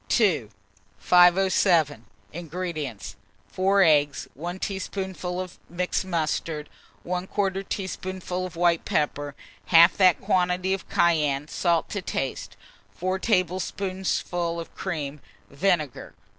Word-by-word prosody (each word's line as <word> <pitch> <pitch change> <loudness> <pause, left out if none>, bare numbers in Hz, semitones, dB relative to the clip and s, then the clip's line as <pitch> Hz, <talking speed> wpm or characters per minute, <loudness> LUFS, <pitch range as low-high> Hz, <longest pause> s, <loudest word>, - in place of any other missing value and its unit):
II. 170 - +2 0.5
507. 175 - +4 0.3
INGREDIENTS. 165 - -5 0.3
4 195 +1 +3
eggs, 145 -4 +3
1 175 +6 -5
teaspoonful 190 -2 -4
of 185 -1 -6
mixed 180 +2 -1
mustard, 160 -3 -2 0.4
1/4 190 +2 -2
teaspoonful 185 -1 -4
of 180 - -13
white 170 -1 +2
pepper, 145 -1 -1 0.3
half 170 +1 +7
that 185 -4 +5
quantity 180 +1 +1
of 195 - -5
cayenne, 150 -4 +2
salt 170 0 +1
to 200 - -2
taste, 135 -6 -4 0.4
4 185 +1 -2
tablespoonfuls 185 -3 -1
of 165 - -8
cream, 150 -6 -4 0.3
vinegar. 155 -2 -1
180 Hz, 105 wpm, -25 LUFS, 155-185 Hz, 0.5 s, half